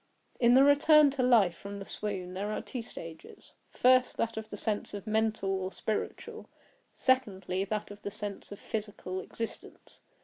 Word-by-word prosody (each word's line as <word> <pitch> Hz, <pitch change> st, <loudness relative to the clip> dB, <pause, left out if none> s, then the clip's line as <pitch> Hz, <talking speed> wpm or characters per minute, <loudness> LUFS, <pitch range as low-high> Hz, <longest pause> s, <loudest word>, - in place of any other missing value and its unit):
In 240 Hz, 0 st, +5 dB
the 265 Hz, -, +8 dB
return 290 Hz, +1 st, +6 dB
to 270 Hz, -1 st, -2 dB
life 225 Hz, -9 st, +4 dB
from 200 Hz, +2 st, -8 dB
the 195 Hz, -, -7 dB
swoon 190 Hz, -4 st, -4 dB
there 200 Hz, +3 st, -3 dB
are 215 Hz, -, -2 dB
two 250 Hz, -, -5 dB
stages; 165 Hz, -7 st, -10 dB, 0.2 s
first, 255 Hz, 0 st, +3 dB
that 230 Hz, 0 st, -1 dB
of 220 Hz, 0 st, -6 dB
the 205 Hz, -, -7 dB
sense 210 Hz, 0 st, -2 dB
of 200 Hz, -, -7 dB
mental 220 Hz, -2 st, 0 dB
or 190 Hz, -1 st, -2 dB
spiritual; 215 Hz, +1 st, -4 dB, 0.5 s
secondly, 195 Hz, -8 st, +1 dB
that 210 Hz, 0 st, -3 dB
of 205 Hz, -, -11 dB
the -, -, -4 dB
sense 205 Hz, -1 st, -6 dB
of 205 Hz, -, -7 dB
physical, 205 Hz, -3 st, -5 dB
existence. 230 Hz, +4 st, -8 dB
210 Hz, 170 wpm, -30 LUFS, 195-235 Hz, 0.5 s, the